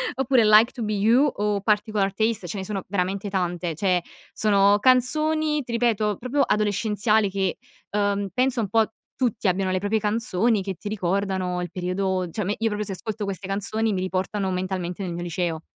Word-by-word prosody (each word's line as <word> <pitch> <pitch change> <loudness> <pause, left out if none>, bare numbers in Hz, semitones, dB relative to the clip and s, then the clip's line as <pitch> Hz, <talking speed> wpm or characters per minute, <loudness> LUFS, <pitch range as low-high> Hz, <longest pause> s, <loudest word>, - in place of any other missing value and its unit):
oppure 260 -3 +3
"Like 215 +3 +6
To 240 - -5
Be 215 0 -1
You" 230 +7 +4
o 205 -1 -1
"Particular 210 -1 +1
Taste". 220 -2 -1
Ce 185 - -5
ne 190 - -4
sono 195 -2 -4
veramente 195 +1 -2
tante, 175 -3 -2
cioè, 180 0 +1 0.3
sono 205 -1 +4
canzoni, 300 +5 +3
ti 240 - -8
ripeto, 220 -4 +1
proprio 255 +4 -1
adolescenziali, 210 0 +1
che, 190 -1 -1 0.3
uhm, 200 -1 0
penso 255 +1 +1
un 205 - -3
po' 225 +1 +2 0.2
tutti 230 -5 -1
abbiano 185 +1 0
le 185 - 0
proprie 205 +3 0
canzoni, 215 0 +1
che 190 0 -4
ti 205 +4 -7
ricordano 190 -2 -1
il 175 -2 -5
periodo, 185 0 -1
cioè 215 - -3
a - - -5
me 205 +3 -1
io 225 - +1
proprio 210 0 -3
se 195 - -3
ascolto 215 +2 -5
queste 195 -1 -5
canzoni, 210 +2 -1
mi 185 - -1
riportano 190 +1 -2
mentalmente 185 0 -3
nel 175 -2 -4
mio 175 +1 -5
liceo. 170 -2 -2
205 Hz, 190 wpm, -24 LUFS, 185-220 Hz, 0.3 s, Like